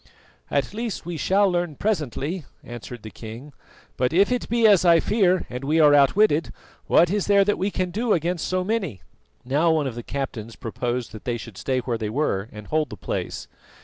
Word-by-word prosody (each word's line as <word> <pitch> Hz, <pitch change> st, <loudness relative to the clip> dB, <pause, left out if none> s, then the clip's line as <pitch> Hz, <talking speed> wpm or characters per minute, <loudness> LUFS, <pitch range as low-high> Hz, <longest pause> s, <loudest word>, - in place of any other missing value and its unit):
"At 140 Hz, +6 st, -1 dB
least 225 Hz, 0 st, -4 dB
we 175 Hz, 0 st, -4 dB
shall 195 Hz, +6 st, +3 dB
learn 175 Hz, -4 st, -1 dB
presently," 160 Hz, -, -2 dB, 0.2 s
answered 120 Hz, -1 st, -9 dB
the 110 Hz, -, -8 dB
king; 120 Hz, +6 st, -10 dB, 0.4 s
"but 125 Hz, 0 st, +1 dB
if 195 Hz, +7 st, +3 dB
it 250 Hz, -, -1 dB
be 235 Hz, -1 st, +2 dB
as 205 Hz, -5 st, +6 dB
I 170 Hz, -2 st, +6 dB
fear 185 Hz, -1 st, +2 dB
and 125 Hz, +2 st, -6 dB
we 155 Hz, +4 st, +1 dB
are 150 Hz, -2 st, +6 dB
outwitted, 150 Hz, +4 st, +4 dB, 0.4 s
what 170 Hz, +1 st, +4 dB
is 205 Hz, -1 st, 0 dB
there 200 Hz, -1 st, +5 dB
that 205 Hz, -, 0 dB
we 195 Hz, -, +1 dB
can 185 Hz, -2 st, -2 dB
do 225 Hz, +4 st, -1 dB
against 170 Hz, -1 st, 0 dB
so 185 Hz, 0 st, 0 dB
many?" 190 Hz, -, -2 dB, 0.4 s
Now 145 Hz, +6 st, +2 dB
one 160 Hz, -2 st, +2 dB
of 130 Hz, -, -3 dB
the 120 Hz, -, -6 dB
captains 115 Hz, -4 st, -5 dB
proposed 120 Hz, 0 st, -3 dB
that 110 Hz, -, -10 dB
they 120 Hz, -1 st, -1 dB
should 115 Hz, -2 st, -10 dB
stay 130 Hz, +5 st, -1 dB
where 120 Hz, -2 st, -3 dB
they 110 Hz, -2 st, -2 dB
were 110 Hz, -5 st, -1 dB
and 105 Hz, -1 st, -10 dB
hold 155 Hz, +3 st, 0 dB
the -, -, -8 dB
place. -, -, -4 dB
155 Hz, 205 wpm, -24 LUFS, 125-190 Hz, 0.4 s, as